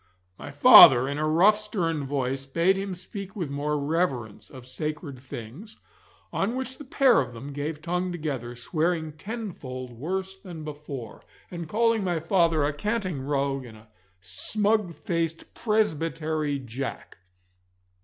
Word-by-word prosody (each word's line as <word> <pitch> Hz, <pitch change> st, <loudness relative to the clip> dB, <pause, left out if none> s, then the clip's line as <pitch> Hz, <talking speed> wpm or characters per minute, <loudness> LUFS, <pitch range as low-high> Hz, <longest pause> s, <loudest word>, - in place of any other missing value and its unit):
My -, -, -7 dB
father 125 Hz, +2 st, +9 dB
in 140 Hz, +1 st, -3 dB
a 155 Hz, -, +1 dB
rough 190 Hz, +7 st, +5 dB
stern 165 Hz, -9 st, -2 dB
voice 135 Hz, -1 st, -2 dB
bade 170 Hz, +7 st, +2 dB
him 195 Hz, -1 st, -3 dB
speak 195 Hz, +2 st, -8 dB
with 170 Hz, -9 st, -3 dB
more 150 Hz, +1 st, -1 dB
reverence 135 Hz, -, -2 dB
of 130 Hz, -2 st, -12 dB
sacred 150 Hz, +1 st, -5 dB
things, 130 Hz, -, -9 dB, 0.6 s
on 210 Hz, +6 st, 0 dB
which 260 Hz, 0 st, -4 dB
the -, -, -7 dB
pair 270 Hz, -3 st, +4 dB
of 120 Hz, -2 st, -6 dB
them 135 Hz, +5 st, -8 dB
gave 150 Hz, +2 st, -4 dB
tongue 180 Hz, +2 st, -1 dB
together, 140 Hz, -8 st, -4 dB
swearing 160 Hz, +5 st, -1 dB
tenfold 155 Hz, -, -7 dB
worse 190 Hz, +10 st, -4 dB
than 175 Hz, -5 st, -9 dB
before, 145 Hz, -6 st, -8 dB, 0.3 s
and 170 Hz, -3 st, -6 dB
calling 230 Hz, +1 st, +2 dB
my 175 Hz, -3 st, 0 dB
father 165 Hz, -3 st, +2 dB
a 145 Hz, -, 0 dB
canting 185 Hz, -2 st, -2 dB
rogue 135 Hz, -1 st, -1 dB
and 115 Hz, -3 st, -12 dB
a 110 Hz, +1 st, -18 dB, 0.3 s
smug 200 Hz, -, 0 dB
faced 165 Hz, -1 st, -3 dB
Presbytery 160 Hz, -8 st, 0 dB
Jack. 130 Hz, -3 st, -6 dB
155 Hz, 145 wpm, -26 LUFS, 135-190 Hz, 0.6 s, father